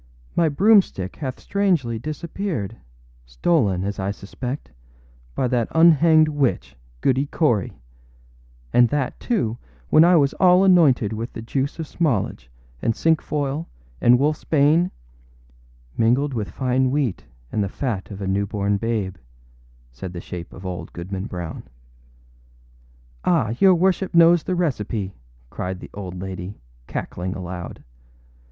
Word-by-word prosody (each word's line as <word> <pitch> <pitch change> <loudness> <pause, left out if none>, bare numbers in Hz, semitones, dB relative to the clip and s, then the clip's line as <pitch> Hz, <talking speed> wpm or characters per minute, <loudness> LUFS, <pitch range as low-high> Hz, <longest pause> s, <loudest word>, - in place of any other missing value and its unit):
âmy 165 -2 +3
broomstick 195 - +3
hath 130 -4 -5
strangely 170 - 0
disappeared, 155 - -4 0.5
stolen, 95 - +1
as 100 0 -3
I 95 +1 -1
suspect, 125 +7 -6 0.6
by 130 - +1
that 120 -2 +1
unhanged 160 -1 +6
witch, 145 - -1 0.3
Goody 135 +2 +2
Cory, 120 - +1 1.0
and 120 -1 +5
that, 145 -3 -2
too, 120 - -1 0.3
when 155 - +7
I 175 +1 +6
was 140 -4 +3
all 180 0 +6
anointed 150 - +4
with 115 +3 -5
the - - -6
juice 135 +4 -2
of 165 - -4
smallage, 125 - -1 0.3
and 115 - 0
cinquefoil, 150 -2 0 0.3
and 120 +1 +6
wolfâs 150 +4 -1
bane.â 155 +4 +4 1.1
âMingled 130 +5 +2
with 110 -4 -3
fine 130 0 0
wheat 135 -7 -1 0.3
and 105 - 0
the 100 - -2
fat 110 -4 -3
of 100 -1 -7
a - - -3
new 100 +1 0
born 100 0 0
babe,â 105 -4 -2 0.7
said 75 +10 -8
the 85 - -5
shape 85 -1 -8
of 90 - -11
old 90 -2 -5
Goodman 95 +3 -5
Brown. 85 -6 -6 1.6
âAh, 115 +2 +1
your 190 -2 +7
worship 185 +1 +1
knows 170 0 +6
the 185 - -2
recipe,â 110 - -2 0.4
cried 90 0 -4
the - - -11
old 95 -3 -7
lady, 95 +1 -6 0.3
cackling 90 +2 -4
aloud. 90 -2 -7
125 Hz, 135 wpm, -22 LUFS, 100-155 Hz, 1.6 s, when